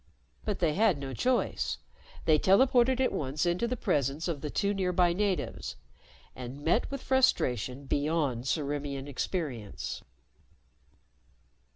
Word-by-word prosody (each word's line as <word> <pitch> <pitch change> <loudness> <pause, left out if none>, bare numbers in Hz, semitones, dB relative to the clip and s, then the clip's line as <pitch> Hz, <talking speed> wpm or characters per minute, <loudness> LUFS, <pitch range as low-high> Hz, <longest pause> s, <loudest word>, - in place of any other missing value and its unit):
But 210 -2 -1
they 165 -4 +1
had 205 -2 +3
no 135 -1 -5
choice. 250 - 0 0.5
They 155 -2 +5
teleported 250 - +4
at 260 - +2
once 145 +3 -1
into 175 +7 +1
the 250 +1 -2
presence 145 - 0
of 160 -5 -3
the 150 - -3
two 200 +6 0
nearby 180 -2 +2
natives 195 0 -1 0.6
and 130 +3 -7
met 195 +9 +2
with 275 -1 -5
frustration 130 - +1
beyond 145 -4 0
Ciriimian 140 -2 -2
experience. 140 - -4
160 Hz, 125 wpm, -30 LUFS, 140-200 Hz, 0.6 s, They